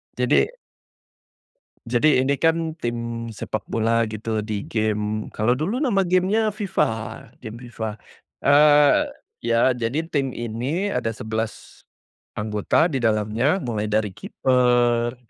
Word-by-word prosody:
Jadi - - +3 1.4
Jadi 125 +5 +3
ini 140 +1 +1
kan 165 +1 +1
tim 115 -1 -4
sepak 110 0 -4
bola 115 +1 +2
gitu, 110 0 -3
di 105 -1 -3
gim 110 -1 -1
kalau 115 +3 +1
dulu 180 - -2
nama 230 -10 +2
game-nya 190 +5 +2
FIFA, 200 -2 0 0.5
game 115 -1 -8
FIFA. 110 -3 -4 0.5
Eee, 145 0 +6 0.4
ya 115 +2 +3
jadi 120 +6 -1
tim 135 -5 -1
ini 125 - -2
ada 120 -7 -1
11 110 0 -5 0.6
anggota 105 - +1
di 135 - -1
dalamnya, 110 - +1
mulai 110 -3 -2
dari 105 -1 0
kiper, 120 -2 +1
120 Hz, 120 wpm, -23 LUFS, 110-150 Hz, 1.4 s, Eee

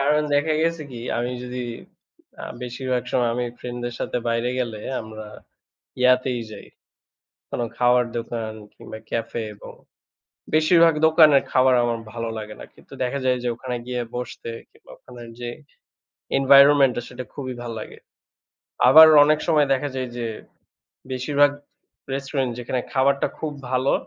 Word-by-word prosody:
কারণ 150 +2 +2
দেখা 150 +2 +2
গেছে 165 -1 0
কি, 120 -2 -8 0.2
আমি 120 +1 -2
যদি 125 0 -5 0.7
অ্যা - - -8 0.2
বেশিরভাগ 125 0 -3
সময় 120 -2 +2
আমি 125 - -1
friend-দের 120 -1 -5
সাথে - - -2
বাইরে 115 +1 0
গেলে 115 -4 -4 0.2
আমরা 110 -1 -9 0.7
ইয়াতেই 125 -1 +3
যাই। 105 - -10 0.9
কোনো 120 - -2
খাওয়ার 125 0 +3
দোকান 115 -1 -4 0.2
কিংবা 110 - -10
cafe, 115 0 -3
এবং - - -12 0.8
বেশিরভাগ 165 +1 +5
দোকানের 155 -3 +6
খাবার 130 0 +4
আমার 120 -1 -1
ভালো 115 -1 -4
লাগে 105 0 -7
না। - - -8
কিন্তু - - -21
দেখা 140 +3 -2
যায় 125 0 +2
যে, 125 - 0
ওখানে 125 0 -5
গিয়ে 125 -1 -2
বসতে 125 -1 -6 0.2
কিংবা - - -21
ওখানের 120 -2 -12
যে, 120 - -4 0.9
environment-টা 140 -1 +6
সেটা 125 +1 -8
খুবই 130 -3 -5
ভালো 120 -1 -6
লাগে। - - -10 0.9
আবার 160 0 +10 0.2
অনেক 155 +1 +3
সময় 150 -4 +3
দেখা 145 +2 -2
যায় 130 -1 -3
যে, 120 -1 -3 0.9
বেশিরভাগ 145 +3 +2 0.6
restaurant 135 -1 -2
যেখানে 125 +1 -2
খাবারটা 140 +1 +2
খুব 155 -1 -4 0.2
ভালো, 130 +1 +1
125 Hz, 140 wpm, -23 LUFS, 120-140 Hz, 0.9 s, আবার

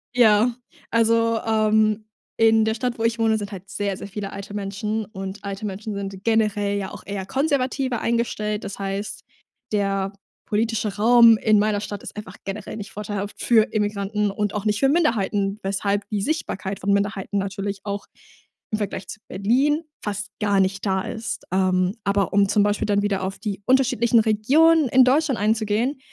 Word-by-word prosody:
Ja, 230 0 +5 0.4
also, 230 0 +3
ähm, 215 -1 +2 0.3
in 225 0 +5
der 220 - +1
Stadt, 240 +1 -2
wo 225 - -3
ich 230 0 +1
wohne, 220 -1 +3
sind 205 0 -6
halt 195 0 -9
sehr, 200 0 -2
sehr 200 - -7
viele 200 0 -6
alte 200 +1 -8
Menschen 210 +2 -3
und 195 -1 -7
alte 200 +1 -5
Menschen 205 +2 -5
sind 195 -1 -6
generell 210 -3 +1
ja 190 - -5
auch - - -10
eher 195 -1 -4
konservativer 265 -1 0
eingestellt. 215 -3 -1
Das 200 0 -7
heißt, 200 +1 -4 0.5
der 195 -1 0 0.3
politische 215 -1 -1
Raum 230 +1 +7
in 215 -1 +3
meiner 210 -1 +1
Stadt 205 -1 -6
ist - - -9
einfach 210 - -8
generell 195 +2 -5
nicht 205 -1 -7
vorteilhaft 205 -1 -5
für 225 -2 +5
Immigranten 210 -1 -1
und 210 0 -2
auch 210 +1 -3
nicht 210 0 +1
für 270 - +4
Minderheiten, 210 - +1
weshalb 200 +1 -1
die 210 -2 -1
Sichtbarkeit 200 - -3
von 200 +1 +1
Minderheiten 200 0 -1
natürlich 195 0 -3
auch 200 0 -4 0.6
im 215 - +1
Vergleich 200 -1 -4
zu 225 - -7
Berlin 265 - +1 0.2
fast 205 0 -4
gar 205 -2 +2
nicht 195 +2 -1
da 190 -1 +1
ist. 225 +3 -5
Ähm, 185 +1 +1
aber 200 -1 +1
um 200 0 +4
zum 205 - +3
Beispiel 205 0 0
dann 205 0 +2
wieder 195 -2 0
auf 195 +1 -3
die 205 -3 -4
unterschiedlichen 250 -3 +3
Regionen 280 +9 +4
in 260 0 +6
Deutschland 270 -1 +2
einzugehen, 220 +5 0
210 Hz, 175 wpm, -23 LUFS, 200-225 Hz, 0.6 s, Raum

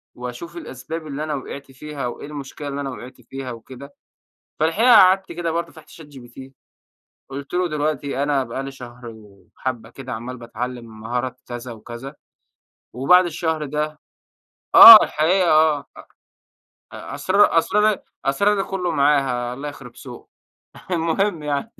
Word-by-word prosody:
وأشوف 125 +8 -8
الأسباب 155 +1 -7
اللي 150 +1 -5
أنا 155 -1 -3
وقعت 140 0 -8
فيها، 140 -1 -6
وإيه 120 - -7
المشكلة 145 0 -8
اللي 140 0 -4
أنا 135 - -4
وقعت 125 0 -10
فيها 130 +2 -7
وكده. 130 +4 -12 0.6
فالحقيقة 220 +10 +4
قعدت 190 -2 +5
كده 170 -1 -3
برضو 170 +1 -3
فتحت 160 - -17
ChatGPT. 135 -4 -13 0.8
قُلت 140 +3 -8
له: 180 0 +1
"دلوقتي 150 -2 -2
أنا 145 -2 +1
بقى 130 +3 -5
لي 135 - -6
شهرين 120 -3 -11 0.4
وحبة 120 -4 -4
كده 130 +1 -8
عمال 120 +3 -7
باتعلم 115 -1 -7
مهارات 125 +2 -4
كذا 120 0 -7
وكذا. 120 +5 -9 0.8
وبعد 140 +10 +4
الشهر 160 -1 -2
ده"، 150 +1 -3 0.8
آه، 230 -1 +13
الحقيقة 175 +4 +1
آه، 155 -2 +3 0.9
أ 140 - -11
أسرار 185 +4 +3
أسرارى 210 +4 +2 0.3
أسرارى 195 +9 +2
كلّه 185 -3 -3
معاها، 135 -5 +1
الله 140 +3 -6
يخرب 130 -4 -12
سوقه. 125 -1 -12 0.6
المهم 170 0 0
يعني. 150 +10 -3
140 Hz, 140 wpm, -21 LUFS, 125-160 Hz, 0.9 s, آه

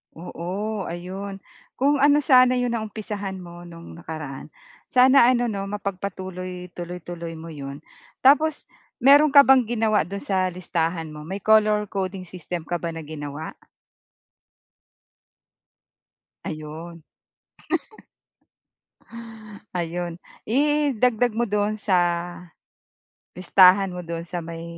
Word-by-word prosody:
Oo 185 +5 -4
ayun. 190 +3 -6 0.3
Kung 280 +2 +2
ano 290 +1 +4
sana 255 -2 +6
'yong 245 -1 0
naumpisahan 210 -3 -4
mo 175 -1 -10
no'ng 170 -1 -11
nakaraan 155 -5 -7 0.4
sana 255 0 +6
ano 245 -1 +2
'no 195 -2 -4
mapagpatuloy, 185 -2 -5
tuloy-tuloy 175 -1 -7
mo 165 +1 -9
'yon. 140 -1 -8 0.4
Tapos 295 +3 +4 0.4
meron 285 +2 +6
ka 280 - +11
bang 265 -3 +5
ginawa 220 -6 +1
do'n 200 +2 -6
sa 190 -2 0
listahan 165 -2 -2
mo 150 0 -10
may 195 +2 -6
color 215 -1 +3
coding 190 -1 -3
system 175 -1 -6
ka 175 +2 -3
ba 165 -1 -4
na 165 - -6
ginawa? 150 0 -7 2.9
Ayun. 160 +2 -7 2.8
Ayun, 170 +1 -3 0.3
idagdag 250 -4 +2
mo 240 - +3
dun 210 +1 +1
sa 190 - +4 1.4
listahan 185 +1 +5
mo 180 - -5
dun 165 0 -4
sa 175 - -2
may 165 0 -7
190 Hz, 110 wpm, -23 LUFS, 170-220 Hz, 2.9 s, ka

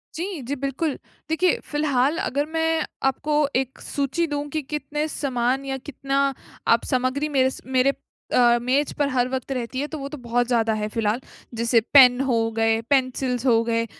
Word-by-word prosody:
जी। 350 -2 -4
जी, 270 +4 -3
बिल्कुल। 275 +3 -2 0.3
देखिए, 345 +2 +2
फिलहाल 295 0 +1
अगर 285 +3 -1
मैं 320 -1 +1 0.3
आपको 300 +2 -3 0.2
एक 260 0 -1
सूची 285 +4 -1
दूँ 290 0 -3
कि 310 - +1
कितने 300 +1 -2
समान 265 -2 -1
या 270 0 -3
कितना 275 0 0 0.5
आप - - -6
सामग्री 260 +3 0
मेरे 260 -2 +3
स - - -9
मेरे 260 +1 +2 0.4
अ, 240 -1 +5
मेज़ 270 +4 +1
पर 290 -1 +2
हर 250 -1 +1
वक़्त 260 0 -4
रहती 255 0 -3
है, 290 - -1
तो 310 - -6
वो 275 - -5
तो 300 - -7
बहुत 240 +1 0
ज़्यादा 225 -3 +2
है, 210 - -1
फिलहाल। 220 +2 -1 0.3
जैसे 235 +1 +3
पेन 255 -2 +8
हो 265 -3 +1 0.2
गए, 225 0 +3
पेंसिल्स 255 -2 +1
हो 230 -2 +4
गए, 230 0 0
265 Hz, 180 wpm, -23 LUFS, 245-290 Hz, 0.5 s, पेन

